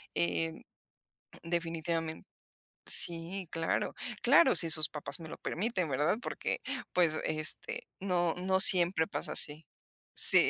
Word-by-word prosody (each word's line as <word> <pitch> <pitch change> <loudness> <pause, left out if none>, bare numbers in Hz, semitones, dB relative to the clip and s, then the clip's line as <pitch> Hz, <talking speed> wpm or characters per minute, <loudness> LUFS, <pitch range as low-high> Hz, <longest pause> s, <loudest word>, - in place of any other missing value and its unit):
eh, 85 -2 -2 0.9
definitivamen 165 -1 -5 0.6
Sí, 175 +2 +2
claro. 165 0 -3 0.3
Claro, 270 -7 +3
si 165 - +5
sus 155 -1 +3
papás 150 +2 -6
me 160 -2 -11
lo - - -10
permiten, 185 -3 -4
¿verdad?, 150 +9 -2
porque, - - -6 0.3
pues, 165 -3 +1
este, 155 0 -1 0.2
no 175 -3 -2
no 190 +1 -2
siempre 175 -3 +7
pasa - - -6
así. 150 +1 +3 0.5
Sí - - +7
165 Hz, 120 wpm, -29 LUFS, 155-180 Hz, 0.9 s, siempre